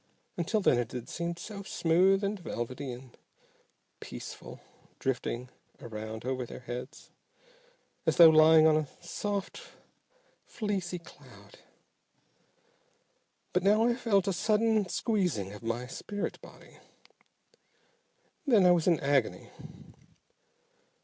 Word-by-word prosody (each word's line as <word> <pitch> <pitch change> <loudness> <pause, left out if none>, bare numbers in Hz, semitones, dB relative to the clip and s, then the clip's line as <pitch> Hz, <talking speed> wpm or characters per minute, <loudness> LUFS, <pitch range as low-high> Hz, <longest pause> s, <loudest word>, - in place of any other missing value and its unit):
Until 195 +6 0
then 125 - +3
it 120 -2 -3
had 125 -2 -6
seemed 170 0 -4
so 200 +2 -7
smooth 190 +2 +2
and 200 0 -1
velvety 130 -3 -5
and 125 0 -11 0.8
peaceful - - -9 0.4
drifting 125 -1 -3 0.3
around 110 0 -7
over 130 0 -2
their 120 - -9
heads, 125 +3 -8 1.0
as - - +2
though 165 -2 +10
lying 155 0 +7
on 160 -1 +5
a 155 -1 0
soft, 205 - -4 0.8
fleecy 195 -5 -3
cloud. 125 - -16 1.9
But 180 - +2
now 210 +4 +4
I 240 - +3
felt 215 -5 +1
a 195 - +1
sudden 215 0 +1
squeezing 180 - -1
of 105 - -10
my 115 +2 -3
spirit 205 +10 -5
body. - - -16 1.7
Then 220 -8 +5
I 180 - +7
was 175 -1 +2
in 175 - +6
an - - -10
agony. 140 -3 0
165 Hz, 115 wpm, -30 LUFS, 125-200 Hz, 1.9 s, though